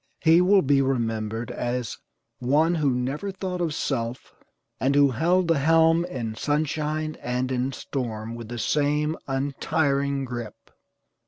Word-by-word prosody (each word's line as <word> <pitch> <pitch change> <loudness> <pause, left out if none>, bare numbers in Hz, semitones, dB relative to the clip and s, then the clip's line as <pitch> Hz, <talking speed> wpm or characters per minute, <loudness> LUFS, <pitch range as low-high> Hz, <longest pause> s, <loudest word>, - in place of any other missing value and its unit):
He 165 +2 +6
will 190 +1 +5
be 140 0 +3
remembered 115 -3 -1
as 120 0 -3 0.4
"one 150 +7 +2
who 155 -4 +1
never 135 +10 -2
thought 185 -2 -4
of 165 -2 0
self, 120 -2 -3 0.5
and 135 +2 +1
who 140 -1 +5
held 170 +8 +2
the 165 -4 +3
helm 165 +3 +4
in 120 -10 -4
sunshine 155 +3 -1
and 125 +1 -2
in 130 +1 0
storm 115 -5 -4
with 115 -1 -7
the 120 - -5
same 150 +4 +1
untiring 140 0 0
grip." 120 -4 -8
140 Hz, 140 wpm, -25 LUFS, 125-155 Hz, 0.5 s, He